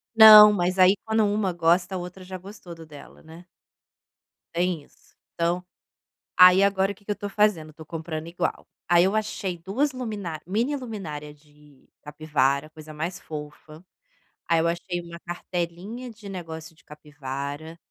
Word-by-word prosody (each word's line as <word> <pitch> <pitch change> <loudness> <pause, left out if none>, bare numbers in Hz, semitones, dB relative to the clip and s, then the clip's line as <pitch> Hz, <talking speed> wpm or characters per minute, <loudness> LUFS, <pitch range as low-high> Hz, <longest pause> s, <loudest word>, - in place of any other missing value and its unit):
Não, 215 -1 +11
mas 185 -1 -1
aí 185 +2 +6
quando 220 0 +2
uma 205 -3 0
gosta 175 +3 +1
a - - -1
outra 180 +1 -8
já 185 0 -7
gostou 185 -2 -11
do 165 -1 -12
dela, 150 -2 -14
né. 165 +2 -14 1.1
Tem 175 -2 -1
isso. - - -27 0.2
Então, 170 +2 -1 0.7
aí 180 +1 +8
agora 195 0 +1
que 205 +1 -25
que 210 - -8
eu - - +3
estou 205 0 -6
fazendo? 195 -7 +1
Estou 160 +1 -13
comprando 160 0 -6
igual. 170 - -3 0.2
Aí 175 0 +5
eu 195 - +1
achei 200 -4 -3
2 230 - -1
luminá 205 -11 -5
miniluminária 205 - -4
de 150 -2 -23
capivara. 150 -1 -1
Coisa 155 0 -12
mais 170 +4 -4
fofa. 155 +2 -10 0.6
Aí 165 -1 +3
eu 165 - +1
achei 175 +1 -3
uma 170 0 -11
cartelinha 175 +7 -5
de 215 -3 -12
negócio 165 -3 -8
de - - -25
capivara. 145 +1 -7
175 Hz, 155 wpm, -25 LUFS, 155-200 Hz, 1.1 s, Não